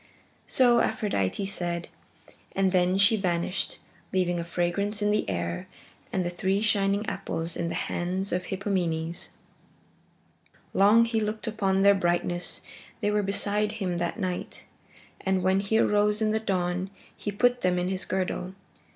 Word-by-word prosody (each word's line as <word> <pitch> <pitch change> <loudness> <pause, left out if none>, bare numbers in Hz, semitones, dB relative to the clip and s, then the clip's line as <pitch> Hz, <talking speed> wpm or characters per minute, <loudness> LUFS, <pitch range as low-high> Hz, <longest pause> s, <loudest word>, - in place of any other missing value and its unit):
So 245 -2 +4
Aphrodite 200 - 0
said, 175 -3 -1 0.7
and 190 -1 +2
then 180 0 +3
she 200 +3 +5
vanished, 180 -1 0 0.3
leaving 175 -2 +1
a - - -2
fragrance 175 +5 -1
in 205 0 +2
the 210 - 0
air 85 -2 -3 0.4
and 185 -2 0
the 175 - -1
three 190 +3 0
shining 205 -1 +2
apples 165 -5 -3
in 170 -1 -2
the - - -3
hands 185 +3 -2
of 180 0 -1
Hippomenes. 175 -4 -2 1.4
Long 210 +4 +6
he 230 -1 0
looked 215 +1 -2
upon 195 -4 +1
their 200 0 +7
brightness. 175 -1 0 0.4
They 210 -2 +1
were 210 0 +2
beside 205 +1 0
him 190 -5 -2
that 175 +6 -2
night, 185 -3 -4 0.6
and 190 -1 +1
when 190 +1 +3
he 200 +3 +1
arose 210 -1 +3
in 215 -1 +1
the 220 - +1
dawn 185 -3 -1 0.3
he 205 - -4
put 245 +4 +2
them 180 -1 +2
in 180 0 0
his 190 0 -2
girdle. 185 0 -2
190 Hz, 150 wpm, -27 LUFS, 175-210 Hz, 1.4 s, their